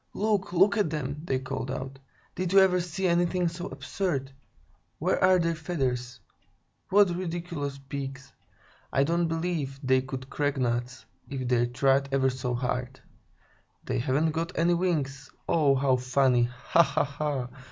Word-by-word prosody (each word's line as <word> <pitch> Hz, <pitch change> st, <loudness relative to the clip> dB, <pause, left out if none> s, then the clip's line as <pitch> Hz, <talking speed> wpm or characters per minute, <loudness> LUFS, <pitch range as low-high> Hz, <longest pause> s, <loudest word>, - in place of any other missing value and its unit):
"Look, 205 Hz, -3 st, 0 dB
look 195 Hz, +4 st, +4 dB
at 205 Hz, -6 st, +2 dB
them!" 145 Hz, -1 st, -4 dB
they 130 Hz, -, 0 dB
called 130 Hz, 0 st, -4 dB
out. 135 Hz, +1 st, -5 dB, 0.3 s
"Did 185 Hz, +1 st, -2 dB
you 195 Hz, -, +8 dB
ever 185 Hz, -1 st, +5 dB
see 180 Hz, +2 st, -2 dB
anything 175 Hz, +1 st, +2 dB
so 170 Hz, +2 st, -4 dB
absurd? 140 Hz, -9 st, -3 dB, 0.7 s
Where -, -, 0 dB
are 185 Hz, 0 st, +6 dB
their 170 Hz, -1 st, +1 dB
feathers? 130 Hz, -7 st, -3 dB, 0.7 s
What 195 Hz, -3 st, +4 dB
ridiculous 170 Hz, -5 st, -4 dB
beaks! 135 Hz, 0 st, -7 dB, 0.6 s
I 135 Hz, -, +3 dB
don't 170 Hz, +3 st, +1 dB
believe 165 Hz, -5 st, -2 dB
they 130 Hz, 0 st, +3 dB
could 130 Hz, 0 st, -6 dB
crack 145 Hz, 0 st, -1 dB
nuts, 125 Hz, 0 st, -2 dB, 0.2 s
if 130 Hz, -2 st, -4 dB
they 120 Hz, -1 st, +2 dB
tried 135 Hz, +2 st, +2 dB
ever 135 Hz, -1 st, +2 dB
so 125 Hz, -1 st, -3 dB
hard. 125 Hz, +1 st, -3 dB, 0.8 s
They -, -, -2 dB
haven't 140 Hz, +5 st, +1 dB
got 165 Hz, +3 st, -3 dB
any 170 Hz, +1 st, +3 dB
wings. 160 Hz, -7 st, -1 dB, 0.2 s
Oh, 145 Hz, -4 st, +3 dB
how 130 Hz, -1 st, +2 dB
funny! 125 Hz, -1 st, +3 dB
Ha, 125 Hz, +7 st, +2 dB
ha, 155 Hz, -1 st, +1 dB
ha! 145 Hz, -3 st, -3 dB
140 Hz, 150 wpm, -28 LUFS, 130-170 Hz, 0.8 s, you